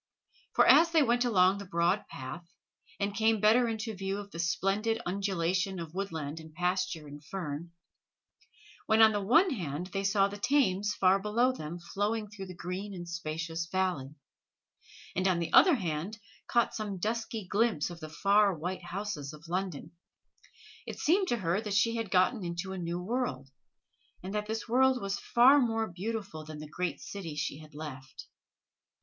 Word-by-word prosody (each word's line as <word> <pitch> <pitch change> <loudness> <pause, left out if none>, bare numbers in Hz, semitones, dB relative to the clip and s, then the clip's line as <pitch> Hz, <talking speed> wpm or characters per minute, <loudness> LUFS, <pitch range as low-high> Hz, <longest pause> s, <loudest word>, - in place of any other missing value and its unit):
For - - +6
as 335 - +7
they 320 -2 +4
went 245 -1 +2
along 190 -4 +4
the 200 - -7
broad 175 +2 +1
path, 130 +6 -7 0.6
and 200 0 -1
came 220 +1 +2
better 225 +4 +5
into 220 0 -3
view 195 0 -3
of 200 -1 -8
the 165 - -8
splendid 195 +7 0
undulation 190 0 -1
of 165 -1 -7
woodland 165 -6 -4
and 160 -1 -13
pasture 180 -2 -1
and 145 0 -11
fern, 165 -2 -5 1.2
when 220 0 +4
on 220 -1 +8
the 205 -1 -1
one 325 - +4
hand 175 - -4
they 195 - -1
saw 195 0 +3
the 205 +1 -8
Thames 210 -6 +2
far 190 +1 +4
below 230 +5 +2
them 165 -8 -6
flowing 205 +5 -2
through 195 -2 -8
the 185 - -9
green 185 +4 -5
and 175 -1 -7
spacious 165 0 -4
valley, 180 -7 -1 1.0
and 185 +1 +1
on 185 -2 +2
the 170 -1 -3
other 360 -5 +8
hand 180 - -3 0.3
caught 235 -1 +2
some 210 -3 -4
dusky 225 +1 -3
glimpse 200 -5 +1
of 170 - -9
the 155 -2 -8
far 200 +3 +3
white 180 +3 -4
houses 175 -6 -4
of 155 +2 -13
London, 180 -3 -3 1.0
it - - -6
seemed 370 +5 +2
to 240 - +1
her 185 0 0
that 210 -3 -3
she 230 +3 +3
had 225 -3 -3
got 185 +5 +4
into 190 -3 -4
a - - -5
new 170 0 -3
world, 180 - -3 0.7
and 190 +2 -5
that 210 0 -2
this 220 +1 -3
world 260 +2 +3
was 195 -2 -3
far 260 +4 +6
more 225 -2 +1
beautiful 200 -3 -5
than 155 0 -9
the 155 0 -8
great 165 -1 -3
city 175 -7 -7
she 150 -1 -3
had 155 -2 -14
left. 135 -4 -8
195 Hz, 175 wpm, -30 LUFS, 170-215 Hz, 1.2 s, on